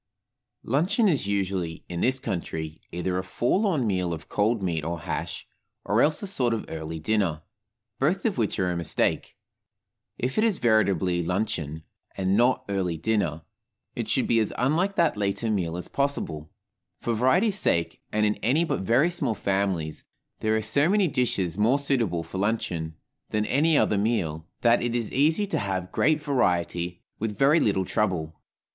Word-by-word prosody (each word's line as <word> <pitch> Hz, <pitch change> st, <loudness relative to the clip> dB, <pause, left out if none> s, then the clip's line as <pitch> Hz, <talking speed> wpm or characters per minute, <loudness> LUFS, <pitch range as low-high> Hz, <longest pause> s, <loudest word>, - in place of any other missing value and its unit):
LUNCHEON 175 Hz, -, +2 dB
is 145 Hz, -, +1 dB
usually, 95 Hz, -4 st, -2 dB
in 85 Hz, -1 st, -4 dB
this 130 Hz, +1 st, +2 dB
country, 80 Hz, -7 st, -4 dB
either 90 Hz, +1 st, -1 dB
a -, -, -3 dB
forlorn 150 Hz, -, +1 dB
meal 90 Hz, -4 st, 0 dB
of 80 Hz, 0 st, -8 dB
cold 105 Hz, 0 st, +1 dB
meat 85 Hz, -4 st, -1 dB
or 85 Hz, +1 st, -3 dB
hash, -, -, -4 dB, 0.4 s
or 105 Hz, +4 st, +2 dB
else 150 Hz, +4 st, +2 dB
a -, -, -1 dB
sort 125 Hz, -12 st, +1 dB
of 110 Hz, -, -5 dB
early 80 Hz, 0 st, -5 dB
dinner, 85 Hz, -3 st, 0 dB, 0.6 s
both 175 Hz, +8 st, +1 dB
of 215 Hz, -4 st, +1 dB
which 110 Hz, -8 st, 0 dB
are 90 Hz, -3 st, +1 dB
a -, -, -2 dB
mistake. 85 Hz, -2 st, -1 dB, 0.8 s
If 130 Hz, -, -1 dB
it -, -, +3 dB
is 220 Hz, -5 st, +2 dB
veritably 95 Hz, -6 st, +2 dB
luncheon, 85 Hz, -4 st, -2 dB, 0.3 s
and 95 Hz, 0 st, +1 dB
not 120 Hz, +4 st, +3 dB
early 95 Hz, -4 st, -1 dB
dinner, 85 Hz, -4 st, -1 dB, 0.5 s
it -, -, -3 dB
should -, -, +1 dB
be 115 Hz, -, +3 dB
as 110 Hz, -, 0 dB
unlike 165 Hz, +10 st, +1 dB
that 165 Hz, -10 st, +2 dB
later 105 Hz, +2 st, -1 dB
meal 90 Hz, -5 st, -1 dB
as 90 Hz, -, -5 dB
possible 110 Hz, -, -2 dB, 0.5 s
for 120 Hz, -, -1 dB
variety's 180 Hz, -, +2 dB
sake, 85 Hz, -, 0 dB
and, 105 Hz, 0 st, +2 dB
in 105 Hz, -, +2 dB
any 140 Hz, +10 st, +2 dB
but -, -, -1 dB
very 125 Hz, -, +3 dB
small 140 Hz, -10 st, -1 dB
families, 95 Hz, -6 st, -1 dB, 0.4 s
there 110 Hz, 0 st, +1 dB
are 110 Hz, -, -2 dB
so 140 Hz, +9 st, +3 dB
many 200 Hz, -1 st, +3 dB
dishes 115 Hz, -, 0 dB
more 115 Hz, +6 st, +4 dB
suitable 120 Hz, -12 st, 0 dB
for 95 Hz, -, -6 dB
luncheon 90 Hz, -7 st, -1 dB, 0.3 s
than 105 Hz, 0 st, 0 dB
any 150 Hz, +5 st, +3 dB
other 105 Hz, -, +2 dB
meal, 85 Hz, -8 st, -1 dB
that 120 Hz, 0 st, +4 dB
it 120 Hz, 0 st, -1 dB
is 115 Hz, -3 st, -2 dB
easy 160 Hz, +9 st, +3 dB
to 200 Hz, -, -1 dB
have 95 Hz, -3 st, -3 dB
great 155 Hz, 0 st, +2 dB
variety 90 Hz, -, 0 dB, 0.2 s
with 105 Hz, -2 st, -3 dB
very 145 Hz, +6 st, +5 dB
little 95 Hz, -6 st, +1 dB
trouble. 85 Hz, -6 st, -1 dB
105 Hz, 170 wpm, -26 LUFS, 90-130 Hz, 0.8 s, very